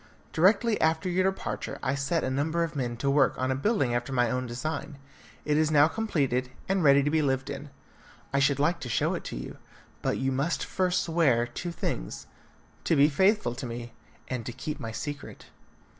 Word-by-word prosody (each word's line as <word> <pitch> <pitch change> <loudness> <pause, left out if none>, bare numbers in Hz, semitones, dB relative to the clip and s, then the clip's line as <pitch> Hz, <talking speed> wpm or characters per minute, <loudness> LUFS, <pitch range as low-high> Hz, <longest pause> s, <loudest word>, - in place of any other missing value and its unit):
Directly 210 +6 +3
after 160 +2 +2
your 185 +2 +2
departure 190 - -5
I 130 - +1
set 140 +4 0
a 130 - -1
number 160 +5 0
of 165 -1 -4
men 120 -4 -2
to 140 +3 0
work 140 -1 +3
on 130 +1 0
a - - +1
building 135 - +1
after 120 +2 -2
my 125 -3 +2
own 125 0 -1
design. 140 +4 -4 0.5
It 150 0 +2
is 155 0 +3
now 150 -1 +6
completed, 140 - 0 0.2
and 195 -2 +1
ready 140 -1 +6
to 145 - 0
be 160 0 +3
lived 135 -1 0
in. 145 +1 -7 0.6
I 140 - +3
should 140 0 +3
like 150 +5 +1
to 125 - -6
show 110 - +1
it - - -4
to - - -5
you, - - -7 0.4
but - - 0
you 135 0 0
must 140 +6 -1
first 180 -1 0
swear 150 -8 +2
two 145 +9 -5
things: - - -4 0.6
to 165 - +3
be 145 +1 +6
faithful 190 - +2
to 125 +1 -6
me, 120 0 -7 0.3
and 125 -3 -3
to - - -3
keep 140 +5 -5
my 115 -4 -5
secret." 145 +5 -7
140 Hz, 205 wpm, -28 LUFS, 130-160 Hz, 0.6 s, now